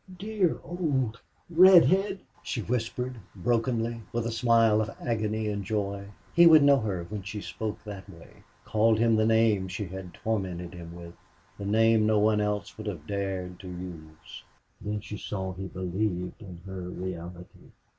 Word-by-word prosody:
"Dear 200 -3 0
old 135 -10 -1 0.3
redhead!" 185 +3 +6 0.2
she 115 - -3
whispered, 125 +2 -2 0.2
brokenly, 115 +2 0
with 115 -1 -1
a 115 - -1
smile 115 -2 +4
of 110 - -2
agony 110 -2 -1
and 100 -1 -2
joy. 100 -1 -2 0.3
He 170 0 +8
would 155 -3 +8
know 140 -1 +6
her 95 -6 -2
when 100 +4 -6
she 95 +3 -6
spoke 110 +1 -5
that 100 -2 -8
way 85 -3 -14 0.3
called 110 +1 +3
him 115 0 +3
the 110 0 +3
name 110 -4 +3
she 95 +3 -4
had 90 -1 -8
tormented 95 -6 -3
him 85 -1 -9
with 85 -1 -10 0.5
the 100 - -4
name 110 +1 +4
no 110 -1 +3
one 105 0 +3
else 105 +1 -2
would 110 - -6
have 85 -8 -5
dared 95 -2 -3
to 95 - -10
use. 85 -4 -9 0.4
Then 105 0 -3
she 105 - -7
saw 95 -2 -4
he 95 +1 -6
believed 90 +1 -3
in 90 -5 -10
her 95 -2 -6
reality. 90 0 -8
105 Hz, 165 wpm, -28 LUFS, 95-115 Hz, 0.5 s, He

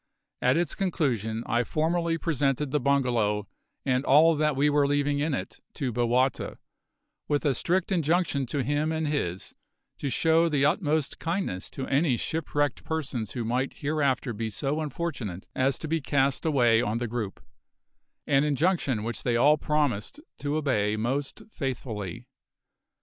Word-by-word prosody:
At 125 +4 +3
its 175 0 0
conclusion 120 - -1
I 120 +2 +1
formally 165 +4 0
presented 145 -4 0
the 150 - +2
bungalow 120 -7 +1 0.4
and 130 0 +1
all 155 +4 +6
that 150 -1 +1
we 140 +2 +3
were 145 -1 +3
leaving 145 0 +1
in 150 -1 0
it - - -6 0.2
to 130 -3 -2
Bowata, 120 +2 +1 0.7
with 145 +1 0
a 140 - +3
strict 180 - 0
injunction 165 -5 +1
to 140 +2 -1
him 145 +4 0
and 160 -1 -1
his 95 - -2 0.5
to 140 - -2
show 165 +5 +3
the 140 -3 +2
utmost 150 -2 0
kindness 165 - -2
to 135 - -5
any 135 -2 +2
shipwrecked 145 -2 -1
persons 130 -9 -3
who 120 -2 -3
might 125 +4 -1
hereafter 140 -4 0
be 110 +1 -3
so 140 +8 -2
unfortunate 135 - -4
as 130 +1 +1
to 160 - -5
be 165 +1 0
cast 140 +2 +1
away 120 -6 +4
on 110 0 -1
the 120 0 -2
group, 110 -4 -4 0.9
an 140 -1 +3
injunction 150 - +1
which 115 +1 -4
they 120 -2 0
all 145 +6 +5
promised 150 - -1 0.2
to 145 +1 -2
obey 105 -9 +1
most 130 +6 -2
faithfully. 120 - -4
140 Hz, 155 wpm, -27 LUFS, 120-155 Hz, 0.9 s, all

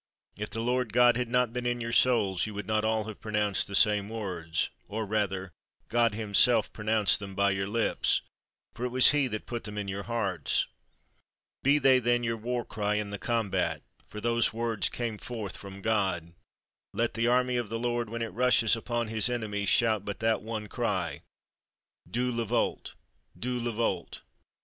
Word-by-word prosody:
If 105 +1 -5
the 115 - -2
Lord 125 -1 0
God 120 0 +6
had 120 -1 -2
not 125 -1 +2
been 125 0 -2
in 120 0 0
your 115 0 -3
souls, 105 -8 +3
you 105 - -7
would 105 -1 -4
not 110 +1 0
all 110 0 +1
have 110 -1 -9
pronounced 105 -2 +1
the 100 - -3
same 105 0 +3
words; 90 -8 -2 0.2
or 110 +1 -3
rather 95 -3 -1 0.4
God 115 -2 +2
himself 110 +1 +3
pronounced 110 -1 +2
them 100 -2 -8
by 100 0 +3
your 95 0 -1
lips, 115 +2 +1 0.5
for 120 - -7
it 125 - 0
was 130 +1 +6
he 145 -2 +2
that 110 -3 -5
put 120 -1 -5
them 105 -1 -6
in 105 -1 -3
your 100 +1 -3
hearts. 100 -9 -1 1.0
Be 140 +2 +4
they, 135 -2 +5
then, 120 0 +1
your 115 -1 0
war 120 +2 -3
cry 105 -1 -1
in 105 -1 -2
the 100 - -5
combat, 95 -9 -1 0.2
for 105 - -8
those 115 +1 +1
words 115 -2 -1
came 115 -3 -4
forth 110 -6 -5
from 100 0 -9
God. 95 -7 0 0.6
Let 115 0 0
the 115 +1 0
army 125 +1 +2
of 120 -4 -2
the 115 - -2
Lord, 120 -1 -1
when 115 +1 -3
it 115 - -5
rushes 120 -2 +4
upon 120 0 -2
his 110 +2 +1
enemies, 105 -5 -2
shout 110 -4 +3
but 100 -1 -5
that 115 0 +1
one 110 -1 -4
cry, 105 - -2 0.9
'_Dieu 125 +4 -1
le 115 -1 -1
veult! 120 - -1 0.4
Dieu 125 0 -2
le 120 - -1
veult! 115 +1 -2
110 Hz, 190 wpm, -29 LUFS, 105-120 Hz, 1.0 s, God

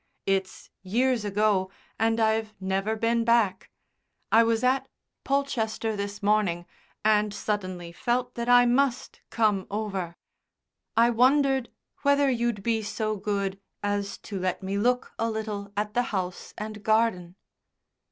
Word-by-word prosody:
It's 195 -1 -2
years 235 +5 +1
ago, 205 -2 +1 0.3
and 225 +1 +2
I've 220 -1 +1
never 195 +3 -1
been 230 +1 +1
back. 230 -5 +2 0.6
I 225 - +7
was 230 0 +1
at 260 +2 +2 0.4
Polchester 230 -5 -1
this 200 +1 -5
morning 200 -5 +1 0.4
and 210 -1 +3
suddenly 185 -5 -3
felt 245 +5 -1
that 235 0 -3
I 245 0 +7
must 250 +1 0
come 210 -4 +1
over. 195 -5 -3 0.8
I 235 +1 +5
wondered 265 +1 +3 0.3
whether 280 -1 +3
you'd 235 -4 -1
be 225 0 +1
so 215 0 -2
good 200 -1 -2 0.2
as 205 0 -1
to 200 -3 -4
let 185 +1 -2
me 190 +1 -2
look 245 +5 +1
a 230 - +1
little 210 -2 -4
at 210 0 -1
the 245 - +3
house 185 -2 -4
and 215 0 -6
garden." 215 -5 +1
215 Hz, 135 wpm, -27 LUFS, 200-235 Hz, 0.8 s, I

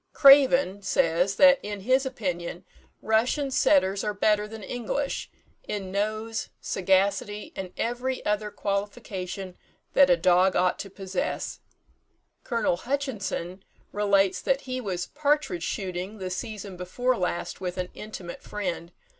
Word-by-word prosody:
"Craven" 270 -7 +6
says, 180 0 +2
that 275 -1 +7
in 205 -1 -5
his 260 +5 +2
opinion 180 -7 -4 0.4
Russian 250 +6 +1
setters 200 -9 +3
are 210 -1 -2
better 210 +1 +2
than 220 -1 -9
English, 245 +6 -3 0.4
in 195 -3 -4
nose, 215 +3 -2
sagacity, 195 +2 0
and 190 -2 -5
every 250 +2 -2
other 210 0 0
qualification 195 -2 -4 0.4
that 280 - +6
a 175 - +5
dog 180 +2 +4
ought 180 0 +2
to 195 - -6
possess. 190 -1 -3 0.8
Col. 230 -8 0
Hutchinson 210 -8 -3 0.3
relates 200 -2 +2
that 275 0 +1
he 255 -1 -4
was 185 -5 -3
"partridge 295 - 0
shooting 185 +3 -4
the 185 -2 -5
season 200 0 -5
before 245 +8 0
last 180 -2 -3
with 180 -1 -3
an 180 0 -2
intimate 195 -5 -8
friend. 180 -4 -4
200 Hz, 130 wpm, -26 LUFS, 185-240 Hz, 0.8 s, that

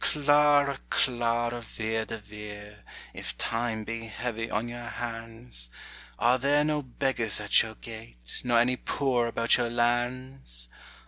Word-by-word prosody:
Clara, 145 -1 +4
Clara 120 -1 +1
Vere 110 0 -2
de 115 - -5
Vere, 105 0 -10 0.3
If - - -5
Time 115 -1 -1
be 115 +1 -5
heavy 115 +1 -3
on 110 +3 -1
your 120 0 -6
hands, 115 - -6 0.5
Are 125 +2 +4
there 145 +3 +3
no 150 -1 +1
beggars 125 -4 0
at 105 -1 +5
your 110 -1 -5
gate. - - -9
Nor 120 -1 +3
any 125 +2 +4
poor 125 -4 +1
about 115 0 +4
your 120 -1 0
lands? 120 - -1
120 Hz, 135 wpm, -28 LUFS, 110-125 Hz, 0.5 s, at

